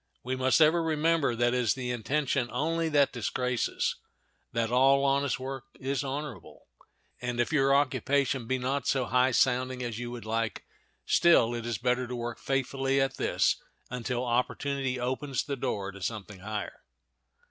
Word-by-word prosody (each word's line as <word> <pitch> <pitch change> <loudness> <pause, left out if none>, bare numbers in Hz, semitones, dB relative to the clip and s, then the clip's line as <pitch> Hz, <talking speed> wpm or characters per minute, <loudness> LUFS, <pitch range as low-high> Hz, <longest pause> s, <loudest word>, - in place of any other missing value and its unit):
We 130 +1 -2
must 130 +4 +3
ever 160 +2 +5
remember 160 -4 +1
that 120 +1 +2
it - - +1
is 120 -4 +2
the 125 -2 -3
intention 125 +2 0
only 165 +5 0
that 145 -2 +3
disgraces; 125 0 -1 0.5
that 115 0 -1
all 135 +2 +4
honest 140 -2 +1
work 135 0 -5
is 135 +1 -1
honorable; 140 -1 -6 0.6
and 120 -1 -3
if 120 +6 +1
your 135 -2 +4
occupation 140 -2 +1
be 130 - +1
not 130 +3 -2
so 130 -2 +1
high 125 +2 +3
sounding 130 0 +1
as 120 -2 -4
you 120 0 -4
would 120 -2 -7
like, 115 -2 -2 0.4
still 120 -9 +4
it 120 -1 -4
is 115 -3 -1
better 125 +1 0
to 125 - -4
work 120 -1 -4
faithfully 135 0 0
at 135 0 0
this - - +2 0.3
until 125 0 -2
opportunity 130 +2 -1
opens 130 +2 -2
the 140 - -3
door 100 -6 -3
to 100 0 -12
something 105 0 -5
higher. 105 +2 -5
130 Hz, 165 wpm, -29 LUFS, 120-140 Hz, 0.6 s, ever